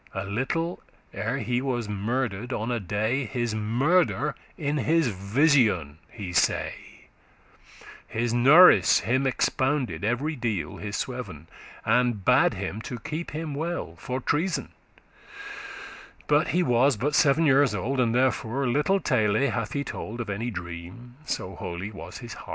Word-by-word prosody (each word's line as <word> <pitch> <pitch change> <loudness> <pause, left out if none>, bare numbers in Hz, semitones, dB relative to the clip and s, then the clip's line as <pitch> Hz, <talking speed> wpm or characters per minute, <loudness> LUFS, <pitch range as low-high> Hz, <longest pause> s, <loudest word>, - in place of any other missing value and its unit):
A 95 +1 -3
little 135 - -2 0.3
ere 115 +5 -2
he 120 0 -1
was 120 -4 -2
murder'd 115 +2 -2
on 115 0 -2
a 120 - 0
day, 110 +7 -1
His 120 +1 -2
murder 140 +8 +1 0.2
in 145 -1 -1
his 155 0 +2
vision 100 - +2
he 95 -5 -7
say.* 80 - +1 1.1
*saw - - -17 0.2
His 115 +1 -1
norice* 140 +10 +7
him 130 +4 +1
expounded 130 - 0
every 125 +9 -1
deal 110 - -3
*nurse - - -11
part - - -6
His 100 - -4 0.4
sweven, 80 +2 -16 0.4
and 120 -3 +1
bade - - +4
him 110 - -4
to 120 - -6
keep* 155 +8 -5
him 155 -1 -5
well 165 +4 -3
*guard - - -18
For 130 +1 -3
treason; 165 +8 -1 1.6
but - - +3
he 180 - +1
was 125 -2 +3
but 145 +7 -1
seven 150 +2 +4
years 135 -5 +4
old, 130 +8 -2
And 120 -2 +2
therefore 130 0 +1
*little 150 +10 +2
tale 110 - +1 0.2
hath 105 - -3
he 140 -1 -1
told* 115 -3 -6
*he 120 - -2
attached 110 - -11
little - - -1
Of 100 - -5
any 120 - -2
dream, 90 +6 -8
so 95 - -3
holy 90 +3 -6
was 100 - -9
his 120 -2 -8
heart. - - -12
120 Hz, 165 wpm, -26 LUFS, 105-140 Hz, 1.6 s, norice